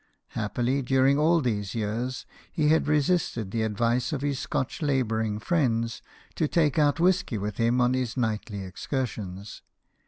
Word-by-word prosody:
Happily, 120 +5 -1
during 135 +2 +3
all 165 +2 +4
these 105 -6 -2
years, 115 +4 -3 0.3
he 150 -2 +1
had 160 0 +3
resisted 150 - +1
the 115 - -1
advice 115 +5 0
of 145 -4 -2
his 140 -2 -1
Scotch 145 -3 -3
labouring 110 -7 0
friends, 115 -4 0 0.3
to 160 - 0
take 155 -2 +2
out 145 +1 +3
whisky 180 - +2
with 105 0 -4
him 115 +2 +2
on 125 0 +3
his 130 -1 -2
nightly 110 -4 -2
excursions. 100 -2 -5
125 Hz, 150 wpm, -27 LUFS, 110-145 Hz, 0.3 s, all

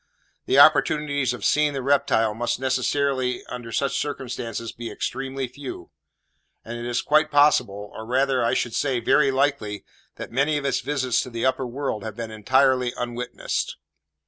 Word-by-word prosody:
The 130 - +2
opportunities 145 -2 +4
of 125 - -5
seeing 150 -1 +3
the 135 -2 -3
reptile 120 -5 +2
must 120 +2 -2
necessarily, 130 0 0
under 120 -2 -7
such 140 +5 0
circumstances, 120 -5 -4
be 115 0 -7
extremely 135 0 -4
few; 130 +2 -9 0.7
and 115 - -6
it 120 0 -6
is 120 0 -1
quite 155 +1 +3
possible, 105 -9 +2
or 110 - -7
rather 130 +2 +1
I 115 - +1
should 120 - -1
say, 130 -2 0
very 140 +3 +3
likely, 135 -7 -1 0.3
that - - -8
many 140 +5 +1
of 145 - -4
its 140 - +1
visits 130 -2 0
to - - -6
the 115 0 -3
upper 130 0 0
world 125 -4 -3
have 110 -2 -6
been 115 -1 -6
entirely 125 +3 +2
unwitnessed. 120 0 -3
130 Hz, 165 wpm, -24 LUFS, 120-140 Hz, 0.7 s, opportunities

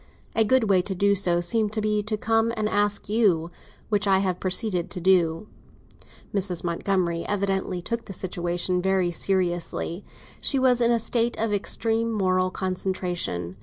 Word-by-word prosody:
A 225 - +3
good 260 +3 +3
way 190 -2 +4
to 190 +1 -4
do 200 +2 +3
so 175 -3 +3
seemed 215 +4 0
to 220 - -1
be 210 0 +1
to 215 +1 -3
come 225 +1 +1
and 215 -1 0
ask 205 -1 0
you; 190 -6 +2 0.4
which 205 -1 +1
I 190 -1 +5
have 185 -2 -1
proceeded 185 -2 -1
to 185 - -5
do." 175 0 +2 0.9
Mrs. 190 -3 -1
Montgomery 170 -1 -1
evidently 195 -3 -1
took 235 +3 -3
the 195 - -8
situation 180 0 -1
very 190 -1 +1
seriously; 175 0 -2 0.4
she 275 - +2
was 255 -2 +3
in 235 - +4
a 235 - +3
state 235 +1 0
of 220 -1 -1
extreme 225 +3 0
moral 185 -3 +1
concentration. 180 - -3
195 Hz, 165 wpm, -25 LUFS, 180-215 Hz, 0.9 s, I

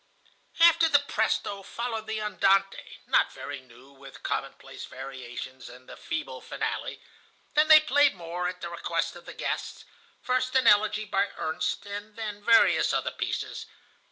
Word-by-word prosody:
"After 335 -1 +6
the 290 - +6
presto 220 -6 -1
followed 225 +1 -5
the 220 0 -2
andante, 195 -2 +1
not - - +3
very 145 -1 -7
new, 130 +2 -18
with 135 -1 -14
commonplace - - -5
variations, 130 -1 -8
and 125 +1 -14
the - - -10
feeble 335 -2 -5
finale. - - -4 0.5
Then 300 +1 +4
they 310 0 +10
played 290 -3 +3
more, 175 0 -4
at 180 0 -6
the 170 - -4
request 170 - -2
of - - -13
the - - -9
guests,—first 255 +1 -4
an 260 -2 +4
elegy 210 0 +4
by 200 0 +1
Ernst, 160 +3 -2
and 205 +1 -7
then 210 -2 -6
various 230 +1 +5
other - - 0
pieces. - - -4
205 Hz, 150 wpm, -27 LUFS, 160-245 Hz, 0.5 s, they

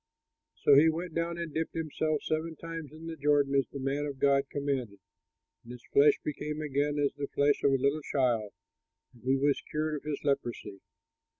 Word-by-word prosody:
'" - - -59
So - - +6
he 150 +4 +7
went 165 +1 -4
down 170 +1 -1
and 170 -3 -5
dipped 160 0 -2
himself 155 -1 -1
seven 160 +1 -2
times 165 -2 -7
in 160 +1 -11
the 165 0 -5
Jordan 145 -2 +2
as 135 -3 +2
the - - -7
man 140 +2 -1
of 140 -2 -6
God 140 0 +2
commanded; 135 -8 -3 0.6
and 120 - -10
his 125 - -12
flesh 145 +1 +6
became 150 +1 -4
again 145 -1 0
like 140 -1 +1
the 140 -1 -3
flesh 145 0 +2
of 140 - +5
a - - +4
little 140 +3 +1
child, 120 -7 0 0.6
and 120 - -19
he 135 +1 +3
was 140 +1 +1
cured 155 0 -1
of - - -9
his 150 -1 -3
leprosy. 120 -8 -2
145 Hz, 200 wpm, -30 LUFS, 135-155 Hz, 0.6 s, he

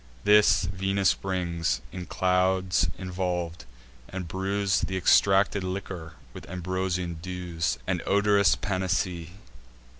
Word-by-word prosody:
This 105 -4 +5
Venus 95 +1 +1
brings, 85 -8 -2
in 90 -1 -7
clouds 95 0 +1
involv'd, 90 -4 -3 0.4
and 90 -2 -5
brews 95 +2 0
Th' 95 - -3
extracted 95 +2 +3
liquor 90 -3 -5 0.2
with - - -11
ambrosian 90 -1 -3
dews, 85 -6 -3
And 90 -2 -1
odorous 100 -2 +4
panacee. 95 -3 -2
90 Hz, 100 wpm, -27 LUFS, 85-95 Hz, 0.4 s, This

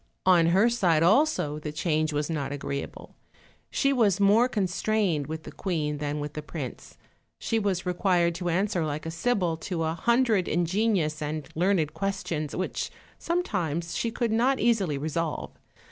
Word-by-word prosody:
On 175 -3 +5
her 190 +7 +4
side 175 -9 +2
also 200 - +3
the 150 0 -5
change 155 0 0
was 150 0 -1
not 150 -4 -3
agreeable: 140 -1 -5 0.6
she 275 0 +1
was 210 -7 +3
more 210 +5 +5
constrained 195 - 0
with 160 +1 -5
the - - -9
queen 150 -6 -2
than 145 0 -2
with 145 0 -5
the 150 - -5
prince; 150 -4 -7 0.4
she 225 - -1
was 195 -3 -1
required 180 -1 +2
to 175 -1 -2
answer 180 0 +1
like 155 0 -3
a 165 - -3
sibyl 175 -2 0
to 165 0 -3
a 160 0 0
hundred 235 0 +2
in 175 +1 +1
genious 175 -5 0
and 150 0 -3
learned 170 -3 +1
questions, 175 -7 -3
which 185 - -2 0.3
sometimes 175 - -2
she 230 - 0
could 235 0 -1
not 250 +4 +2
easily 200 -11 +2
resolve. 160 +2 -3
175 Hz, 160 wpm, -27 LUFS, 155-205 Hz, 0.6 s, On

